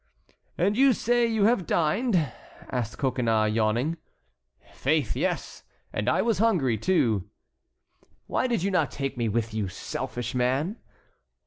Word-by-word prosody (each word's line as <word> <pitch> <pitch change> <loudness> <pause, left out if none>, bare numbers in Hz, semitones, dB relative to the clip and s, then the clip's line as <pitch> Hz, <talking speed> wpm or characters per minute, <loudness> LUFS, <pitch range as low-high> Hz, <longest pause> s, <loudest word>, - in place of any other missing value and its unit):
"And 200 +4 +2
you 270 +2 +5
say 240 +2 +2
you 220 -3 +1
have 210 -5 +3
dined?" 195 +9 +1 0.6
asked 120 -4 -3
Coconnas, 115 -5 +1
yawning. 115 +9 +1 0.8
"Faith, 145 -3 0
yes, - - -2 0.3
and 105 - 0
I - - +2
was 225 -4 +1
hungry 175 - +2
too." 110 - +1 1.0
"Why - - 0
did 235 -8 0
you 200 - 0
not 160 -7 +2
take 135 -1 -4
me 120 -2 -1
with 110 +1 -1
you, 110 -3 -1
selfish 120 +5 -5
man?" 130 - 0
135 Hz, 135 wpm, -26 LUFS, -, 1.0 s, you